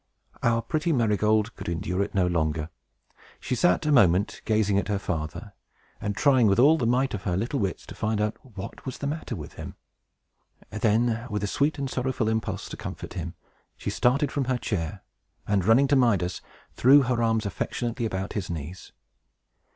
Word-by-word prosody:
Our 115 -1 +2
pretty 155 +8 -1
Marygold 110 -3 +2
could - - -6
endure 90 +3 -2
it 100 - -3
no 95 -2 +3
longer. 80 -2 -1 0.7
She - - -3
sat, 90 +8 +2
a 150 - +2
moment, 100 - +3
gazing 105 -2 +2
at 95 - -3
her 105 -1 0
father, 90 +2 -4 0.5
and 100 -1 -3
trying, 130 -6 +4
with 100 - +3
all 145 +6 +6
the 120 - +1
might 130 +3 +1
of 105 - -3
her 90 -3 -1
little 120 +7 -1
wits, 95 -5 -2
to - - -9
find 110 0 -1
out 105 0 0
what 100 -6 -9
was 130 - -5
the - - -5
matter 145 -4 -3
with 75 -6 -8
him. - - -8 1.0
Then, 115 +2 +1
with 105 -1 -2
a - - 0
sweet 145 +8 0
and 140 -1 -2
sorrowful 125 -3 -1
impulse 110 0 -2
to - - -7
comfort - - -7
him, 85 -1 -5 0.4
she - - -3
started 135 +4 +2
from 140 -2 -1
her 130 0 0
chair, 95 -4 -3 0.4
and, 100 -2 +2
running 120 +6 +5
to 145 - +4
Midas, 100 -9 +2 0.3
threw 140 +3 +6
her 120 -2 0
arms 115 -1 +1
affectionately 115 +4 -2
about 95 -1 -4
his 100 -3 -3
knees. 85 +2 -7
110 Hz, 185 wpm, -26 LUFS, 95-125 Hz, 1.0 s, all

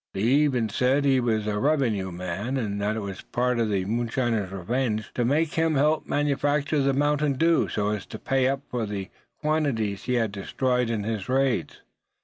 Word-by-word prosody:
They 95 - -3
even 130 0 +3
said 130 +6 +2
he 135 -2 +4
was 110 -3 0
a 105 -1 -1
revenue 120 -10 +1
man; 90 +9 -3
and 100 -5 -2
that 105 +1 0
it 110 - -3
was 100 -2 -6
a - - -12
part 125 0 0
of 115 -2 +1
the 95 -3 0
moonshiners' 115 -2 -1
revenge 110 +3 -2
to 120 - 0
make 150 +6 +1
him 160 -1 +1
help 150 +3 +2
manufacture 145 +1 +1
the 135 0 +2
mountain 145 +1 +1
dew, 165 +4 +3
so 105 -1 -1
as 105 -2 -3
to - - -7
pay 135 -1 +1
up 135 0 0
for 120 -3 -1
the 100 -1 -5 0.3
quantities 140 -10 0
he 125 - 0
had 115 -4 +1
destroyed 125 +4 -1
in 110 -3 -1
his 110 0 -3
raids. 130 - 0
125 Hz, 195 wpm, -26 LUFS, 105-140 Hz, 0.3 s, he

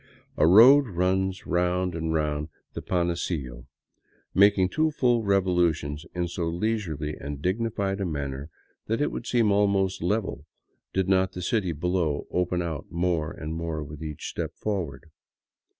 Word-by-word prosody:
A 75 - +4
road 125 +9 +8
runs 95 0 0
round 90 +1 0
and 80 -1 -2
round 75 -1 -1 0.2
the - - -5
Panecillo, 85 -8 -2 0.7
making 100 -1 +5
two 155 +8 +1
full 125 -6 +2
revolu 90 -5 +2
tions 75 +4 -7
in 90 -1 -1
so 85 0 -3
leisurely 85 -5 -2
and 70 0 -6
dignified 100 +2 -1
a - - 0
manner 70 -2 -4 0.4
that 115 +1 0
it 145 - +1
would 120 - -6
seem 115 -4 +3
almost 100 -2 +2
level 100 +4 -2 0.4
did 95 -1 0
not 95 -1 +2
the 90 - -5
city 95 -2 0
below 85 -1 -1
open 90 0 0
out 80 -4 -5
more 85 -3 0
and 80 -2 -6
more 80 -2 -3
with 75 +1 -10
each 75 -2 -6
step - - -4
forward. 85 -8 -4
90 Hz, 150 wpm, -26 LUFS, 80-100 Hz, 0.7 s, road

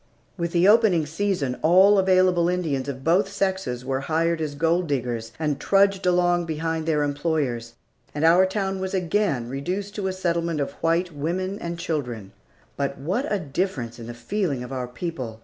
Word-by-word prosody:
With 170 -2 -3
the 175 +2 +3
opening 210 -7 +5
season 160 -5 -1
all 190 +5 +6
available 185 -2 +3
Indians 160 -7 -1
of 135 -1 -6
both 185 +6 +2
sexes 190 -11 -2
were 135 0 -1
hired 165 +3 0
as 150 -2 -3
gold 165 +3 +1
diggers, 120 -5 -2
and 150 -3 -1
trudged 195 -1 +2
along 175 -1 +2
behind 160 0 -2
their 150 -2 +2
employers, 145 -6 -2 0.4
and 150 +2 +1
our 175 +3 +6
town 195 -1 -2
was 190 +1 -3
again 175 - 0
reduced 180 +10 -4
to 200 -2 -1
a - - 0
settlement 170 -3 -1
of 140 - -2
white 170 +2 +1
women 185 +7 -2
and 170 -4 -5
children. 125 -12 -4 0.5
But 140 -1 -2
what 190 - -2
a 205 - +2
difference 140 -7 -3
in 115 - -8
the 120 - -7
feeling 140 - -2
of 125 +2 -7
our 125 -1 -3
people! 125 -4 -6
165 Hz, 175 wpm, -24 LUFS, 140-185 Hz, 0.5 s, all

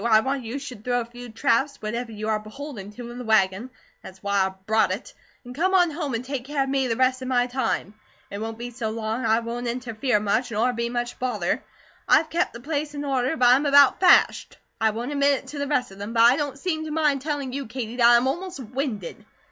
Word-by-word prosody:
I 220 -2 +5
want 265 +1 -2
you 235 +4 -4
should 255 -6 -8
throw 245 0 +1
a - - -5
few 245 +1 -11
traps, 275 +5 +1
whatever 230 +2 -4
you 215 0 -5
are 215 -1 +1
beholden 215 -1 -8
to, 240 +1 -8
in 245 - -8
the - - -5
wagon 220 0 +2 0.3
that's 190 +1 -13
why 200 -1 +2
I 190 - -8
brought 220 +1 +3
it - - -5 0.3
and 245 - -8
come 370 +8 +1
on 355 -3 +4
home 295 -5 -3
and 235 +2 -4
take 270 -2 -4
care 285 0 0
of 270 - -4
me 270 -1 +1
the 230 - 0
rest 255 +1 +2
of 255 - -5
my 245 -1 +2
time. 250 -5 -2 0.4
It 200 - -5
won't 225 0 -4
be 240 +1 -6
so 230 -2 -3
long; 225 +2 -3
I 220 +1 +3
won't 240 +1 -4
interfere 240 -1 -1
much, 215 +4 0
nor 230 +4 +1
be 235 0 -2
much 240 0 -3
bother. 255 0 -1 0.5
I've 320 - +4
kep' 335 - +1
the 235 - -10
place 295 +1 -3
in 290 0 -4
order, 270 +2 0
but 245 -3 +5
I'm 270 +4 +4
about 280 -1 +6
fashed. 370 - +4 0.2
I 220 - +4
won't 235 +5 -4
admit 280 -1 +2
it - - -19
to 290 - -6
the 285 - -2
rest 265 -7 0
of 195 - -13
them; 205 +3 -5
but 230 -1 +5
I 240 +2 +7
don't 285 -2 -3
seem 315 0 -2
to - - -5
mind 300 -3 +1
telling 285 -3 -3
you, 275 -2 -4
Katie, 235 0 -5
that 235 -2 +6
I 240 - +7
am 245 +2 +1
almost 350 +4 -3
winded. 245 - -4
245 Hz, 250 wpm, -24 LUFS, 225-280 Hz, 0.5 s, I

